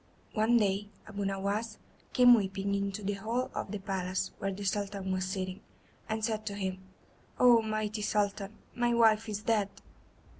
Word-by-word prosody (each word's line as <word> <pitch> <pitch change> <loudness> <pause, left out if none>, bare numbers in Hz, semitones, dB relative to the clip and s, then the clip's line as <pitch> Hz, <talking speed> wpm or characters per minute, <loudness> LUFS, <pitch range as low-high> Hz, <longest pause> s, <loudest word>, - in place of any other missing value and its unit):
One 225 +2 +4
day 205 -1 +1 0.2
Abu 200 -2 -4
Nowas 200 +3 -2 0.3
came 245 -1 +8
weeping 195 -2 +1
into 200 +1 -2
the 205 +1 0
hall 225 +5 -2
of - - -4
the 210 - -3
palace 190 -1 -2
where 195 - -1
the 200 +1 -6
Sultan 195 -1 -1
was 185 0 0
sitting, 185 0 -4 0.5
and 220 0 0
said 220 -2 -2
to 200 - -3
him: 190 -2 -3 0.6
"Oh, 240 -2 +7
mighty 215 -1 -2
Sultan, 205 0 -1 0.2
my 240 0 +1
wife 225 -1 +4
is 210 0 -4
dead." 215 -3 +2
205 Hz, 160 wpm, -31 LUFS, 195-220 Hz, 0.6 s, came